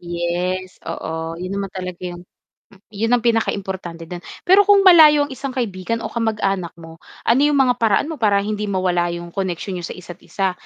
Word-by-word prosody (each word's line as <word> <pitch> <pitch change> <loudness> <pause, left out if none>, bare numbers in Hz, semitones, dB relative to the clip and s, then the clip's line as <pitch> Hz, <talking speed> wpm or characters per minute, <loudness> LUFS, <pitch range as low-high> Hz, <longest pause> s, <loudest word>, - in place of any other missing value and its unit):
Yes, 175 +2 -3
oo. 160 0 -5
'yun 185 +2 -5
naman 195 - -4
talaga 180 -2 -7
yung 175 0 -9 0.5
m 200 - -18
'yun 220 +3 -1
ang 240 - -2
pinakaimportante 190 -7 -1
do'n. 175 +2 -7 0.2
Pero 395 +2 +5
kung 400 -1 +6
malayo 310 -6 +8
ang 285 - -6
isang 265 0 -6
kaibigan 230 -2 -3
o - - -5
kamag-anak 205 -6 -1
mo, 165 -1 -13 0.2
ano 235 +3 +3
'yong 295 +1 +3
mga 260 -3 +4
paraan 225 +7 +2
mo 310 - -7
para 200 -3 +2
hindi 210 0 -3
mawala 180 -3 0
yung 170 0 -8
koneksyon 185 -1 -3
niyo 170 - -5
sa - - -7
isa't 175 -1 -11
isa? 195 -2 -2
195 Hz, 190 wpm, -20 LUFS, 175-230 Hz, 0.5 s, malayo